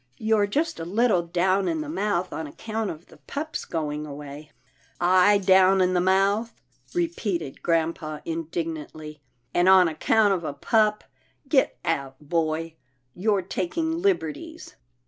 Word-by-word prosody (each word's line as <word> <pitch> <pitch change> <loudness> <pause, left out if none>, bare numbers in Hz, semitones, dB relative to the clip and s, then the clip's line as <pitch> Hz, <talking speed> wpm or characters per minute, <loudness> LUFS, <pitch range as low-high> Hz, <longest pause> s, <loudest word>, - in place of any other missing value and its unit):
You're 220 -2 +2
just 295 - -1
a - - -4
little 205 +2 +2
down 185 +3 +1
in 320 -1 -1
the 305 - -5
mouth 205 - -1
on 160 -1 -4
account 220 +7 -4
of 160 +1 -8
the - - -18
pup's 305 +2 -5
going 150 -2 -3
away." 145 +1 -9 0.5
''I 185 +3 +5
down 190 0 +6
in 185 0 +2
the 180 - +2
mouth," 195 +5 +2 0.4
repeated 210 - -2
grampa 160 -2 -1
indig 165 0 -3
nantly, 155 -1 -8 0.2
" 120 +1 -45
and 175 +1 +4
on 190 -2 +7
account 205 +6 +2
of 180 -3 -2
a 150 - -3
pup. 210 +8 +1 0.4
Get 270 -1 +2
out, 140 -5 -1
boy, 160 +1 -2 0.4
you're 200 +1 0
taking 320 - -2
liberties." 330 - -2
180 Hz, 145 wpm, -25 LUFS, 160-215 Hz, 0.5 s, on